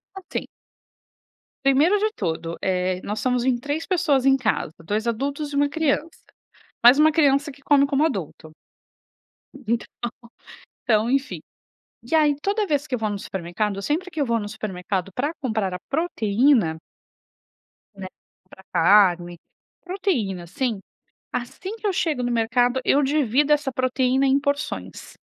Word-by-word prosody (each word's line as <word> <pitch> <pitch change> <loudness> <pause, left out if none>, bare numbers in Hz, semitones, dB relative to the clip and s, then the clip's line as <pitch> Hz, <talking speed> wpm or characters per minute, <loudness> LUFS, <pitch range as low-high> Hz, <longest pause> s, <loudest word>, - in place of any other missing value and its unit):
Assim. 385 -2 -5 1.2
Primeiro 290 +9 +4
de 430 +1 0
tudo, 165 -3 -3
eh, 185 -1 0
nós 210 +1 -3
somos 250 -1 0
em 255 -2 +2
3 290 +6 -3
pessoas 315 -8 +1
em 270 0 +6
casa, 220 - -1
2 215 +6 -2
adultos 280 +5 -2
e - - -3
1 285 0 +2
criança, 315 +1 -1 0.6
mas 245 +4 +8
1 310 0 +5
criança 285 -1 +2
que 280 - -19
come 280 0 +4
como 280 +2 +1
adulto. 175 - -5 1.2
Então 235 0 0 1.0
então, 220 0 +2
enfim 275 +1 -1 0.7
e - - -4
aí 300 -2 +4
toda 410 +1 0
vez 290 -4 0
que 270 - -4
eu 250 - 0
vou 215 -1 -1
no 200 - -3
supermercado 195 +3 -3
sempre 350 - -2
que 310 -2 -5
eu 280 - +1
vou 235 0 +1
no 205 - -5
supermercado 195 -3 -4
para 290 +5 -1
comprar 220 -6 -1
a - - -4
proteína 240 - +2 1.2
Né? 190 -1 -7 0.4
Compra 190 +1 -17
carne, 175 -1 +4 0.5
proteína, 285 - -2
assim. 220 +4 -2 0.5
Assim 370 - -5
que 430 - -3
eu - - +2
chego 315 -9 0
no 245 - -1
mercado, 245 +2 +2
eu 285 - +3
divido 285 0 +2
essa 290 -2 0
proteína 255 +1 +1
em 270 +1 +3
porções. 285 0 -4
260 Hz, 150 wpm, -23 LUFS, 210-295 Hz, 1.2 s, mas